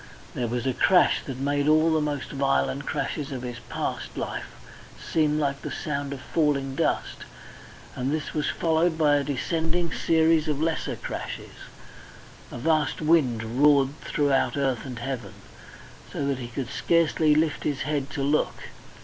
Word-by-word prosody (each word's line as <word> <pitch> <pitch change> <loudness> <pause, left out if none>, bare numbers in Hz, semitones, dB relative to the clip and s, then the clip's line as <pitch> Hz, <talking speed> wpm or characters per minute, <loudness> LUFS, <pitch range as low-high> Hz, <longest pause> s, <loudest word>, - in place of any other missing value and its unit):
There 120 - -2
was 120 +1 -2
a 130 - +1
crash 180 +7 +4
that 135 -3 -4
made 145 +1 0
all 155 +1 +4
the 155 - +2
most 145 -3 -3
violent 135 - 0
crashes 145 -1 -2
of 130 -2 -5
his 120 -1 -5
past - - -4
life - - -4 0.5
seem 155 -2 +1
like 140 -2 -1
the - - -5
sound 145 -2 -3
of 140 -2 -6
falling 140 -3 0
dust, - - -1 0.8
and 130 +2 -1
this 155 -1 -3
was 150 - 0
followed 165 0 +1
by 150 -2 +4
a 140 - 0
descending 165 +4 -1
series 160 -1 +3
of 150 -2 -1
lesser 160 +1 -1
crashes. - - -6 1.0
A - - -6
vast 155 +1 +1
wind 130 -7 +1
roared 140 -2 +5
throughout 145 -1 +1
earth 135 -2 0
and 125 -2 -6
heaven, 120 0 -5 0.8
so 140 - -2
that 140 -2 -1
he 120 - -5
could 120 +1 -5
scarcely 160 -1 +3
lift 155 -1 +1
his 145 -3 -1
head 145 -2 -1
to 140 - -3
look. 145 +2 +1
145 Hz, 160 wpm, -26 LUFS, 135-155 Hz, 1.0 s, roared